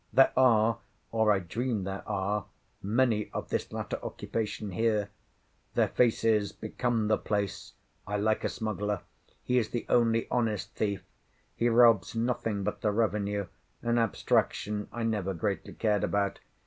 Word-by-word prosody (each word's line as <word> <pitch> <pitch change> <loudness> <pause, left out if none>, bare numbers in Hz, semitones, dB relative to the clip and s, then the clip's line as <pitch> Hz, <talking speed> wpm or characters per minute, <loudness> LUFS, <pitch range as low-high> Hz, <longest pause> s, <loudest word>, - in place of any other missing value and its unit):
There 135 - +5
are, 115 -3 +4 0.3
or 110 -1 +3
I 100 - +4
dream 110 +4 -2
there 95 +1 -4
are, 100 +1 -1 0.4
many 110 0 +1
of - - -4
this - - -2
latter - - -4
occupation 105 -2 -3
here. 105 +1 +1 0.7
Their - - +3
faces 110 -3 +2
become 115 0 -1
the 110 - +2
place. 100 -2 -2 0.3
I 105 0 -1
like 110 +1 +1
a - - +1
smuggler. 105 -3 -2 0.4
He 125 0 +2
is 115 - -2
the 120 - -3
only 115 -1 +3
honest 115 -5 0
thief. 100 -3 -1 0.5
He 120 - +2
robs 115 -2 +5
nothing 115 -3 -1
but - - -3
the 105 - +2
revenue,—an 105 +2 -1
abstraction 105 -1 0
I 120 - -4
never 105 -4 -1
greatly 100 +3 -2
cared 105 -3 +1
about. 100 -1 0
110 Hz, 145 wpm, -29 LUFS, 100-115 Hz, 0.7 s, There